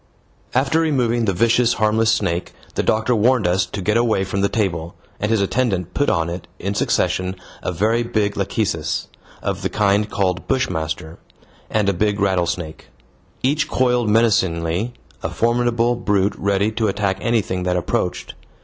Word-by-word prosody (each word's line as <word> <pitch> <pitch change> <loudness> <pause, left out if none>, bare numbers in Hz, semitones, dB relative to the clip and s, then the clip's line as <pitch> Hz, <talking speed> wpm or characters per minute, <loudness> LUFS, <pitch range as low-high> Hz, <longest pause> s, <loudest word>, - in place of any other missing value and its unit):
After 135 +5 +2
removing 125 -7 +1
the 100 - +2
vicious 115 +5 +3
harmless 110 +1 +2
snake, 85 -3 -1 0.2
the - - 0
doctor 110 +3 +1
warned 115 +1 +3
us 90 +2 +2
to 100 - -5
get 105 +4 +2
away 115 -5 +2
from 100 +1 -2
the 100 - +2
table, 85 -6 -2 0.2
and 105 - -1
his 110 -2 +2
attendant 95 -5 0
put 145 - +1
on 80 -1 +1
it, 85 +2 -6
in 100 +2 -3
succession, 95 -1 0 0.3
a - - -2
very 110 +7 +1
big 110 -4 0
lachecis 95 -6 -1 0.3
of 100 0 -2
the 95 - -1
kind 105 +2 +2
called 95 -4 -1
bushmaster 80 - -2 0.5
and 105 -2 +1
a 100 - +3
big 105 +2 0
rattlesnake. 90 -4 -1 0.6
Each 150 +4 +2
coiled 125 -3 +1
menacingly, 100 -1 +1 0.3
a - - -2
formidable 120 0 +1
brute 100 -3 +1
ready 100 +2 +1
to 110 0 0
attack 100 -1 -1
anything 110 -6 0
that 90 0 0
approached. 90 - -2
105 Hz, 160 wpm, -20 LUFS, 90-115 Hz, 0.6 s, vicious